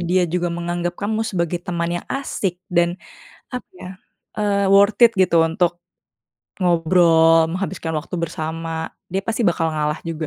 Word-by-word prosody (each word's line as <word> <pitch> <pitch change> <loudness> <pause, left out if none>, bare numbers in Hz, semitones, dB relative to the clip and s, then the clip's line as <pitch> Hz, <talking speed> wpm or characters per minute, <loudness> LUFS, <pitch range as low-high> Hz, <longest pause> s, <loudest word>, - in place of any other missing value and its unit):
dia 180 +1 +1
juga 175 +1 -1
menganggap 175 +1 -3
kamu 215 +2 -2
sebagai 175 -5 -2
teman 175 0 -2
yang - - -22
asik, 205 -9 -3 0.2
dan, 175 0 +2 0.5
apa 250 -1 -6
ya, 185 - -9 0.5
eee, 200 -1 +1
worth 200 +3 +4
it, 235 - +9
gitu, 170 -3 +4
untuk 170 +1 0 0.8
ngobrol, 165 -2 +4
menghabiskan 170 -1 -4
waktu 155 +3 -4
bersama, 160 0 -4 0.2
dia 190 +2 -3
pasti 225 +2 -1
bakal 165 -2 +1
ngalah 150 0 -2
juga. 165 -1 -4
175 Hz, 145 wpm, -21 LUFS, 165-190 Hz, 0.8 s, it